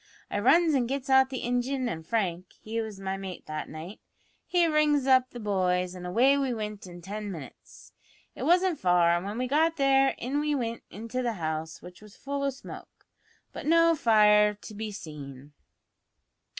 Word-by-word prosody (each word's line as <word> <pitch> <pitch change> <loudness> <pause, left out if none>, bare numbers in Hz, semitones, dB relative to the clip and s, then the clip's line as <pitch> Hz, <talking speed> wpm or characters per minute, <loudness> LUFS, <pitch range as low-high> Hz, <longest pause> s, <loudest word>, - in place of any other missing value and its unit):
I - - -1
runs 315 +8 +4
an' 255 -4 +1
gets 270 +1 -3
out 265 0 +5
the 260 -2 -5
ingin, 245 +2 -1
an' 160 -9 -4
Frank 180 -1 -2
(he 225 +1 -3
was 215 -3 -7
my 195 0 -3
mate 190 -2 -8
that 155 0 -5
night) 160 +6 -9 0.5
he 350 -1 +3
rings 305 -3 +2
up 260 -1 +4
the 245 - -9
boys, 185 -3 0
an' 180 0 -7
away 250 +9 +4
we 265 -3 -1
wint 210 -2 -6
in 175 -1 -11
tin 205 +2 -5
minutes. 155 -7 -12 0.4
It - - -10
wasn't 355 0 +2
far, 175 -2 +3
an' 175 +2 -3
when 205 +3 -5
we 250 - -1
got 320 +4 +2
there 270 -1 +3
in 265 +5 -2
we 300 0 0
wint 230 -3 -3
into 230 +4 -5
the 240 -2 -1
house, 160 -3 -4
which 180 +2 -12
was 210 -1 -15
full 280 0 -4
o' 280 - +1
smoke, 270 0 -11 0.5
but - - -7
no 335 +1 +5
fire 210 -6 +4
to 210 - -12
be 215 +1 -5
seen. 145 -7 -10
225 Hz, 190 wpm, -28 LUFS, 185-270 Hz, 0.5 s, out